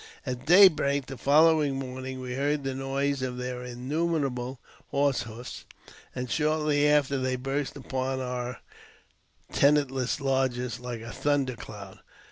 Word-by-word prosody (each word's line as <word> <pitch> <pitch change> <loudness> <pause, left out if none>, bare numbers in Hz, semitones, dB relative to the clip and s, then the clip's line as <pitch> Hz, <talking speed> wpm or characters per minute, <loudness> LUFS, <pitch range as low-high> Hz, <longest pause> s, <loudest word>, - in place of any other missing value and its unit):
At 125 +2 -5
daybreak 155 -7 +6
the 135 - -7
following 150 +2 +4
morning 130 0 -5
we 125 -1 -5
heard 145 +2 0
the 135 -1 -2
noise 135 +1 -1
of 125 -1 -3
their 125 0 -4
innumerable 130 0 -2 0.3
horse 140 -1 +1
hoofs, 115 +1 -8 0.5
and 125 0 -3
shortly 150 +1 +2
after 140 -2 +3
they 130 0 0
burst 135 +2 -3
upon 130 -1 -3
our 125 -1 -4 0.9
tenantless 140 -2 +2
lodges 130 -4 0
like 120 -2 -6
a 115 0 -7
thunder 135 -1 0
cloud. 100 -4 -10
135 Hz, 130 wpm, -28 LUFS, 125-145 Hz, 0.9 s, daybreak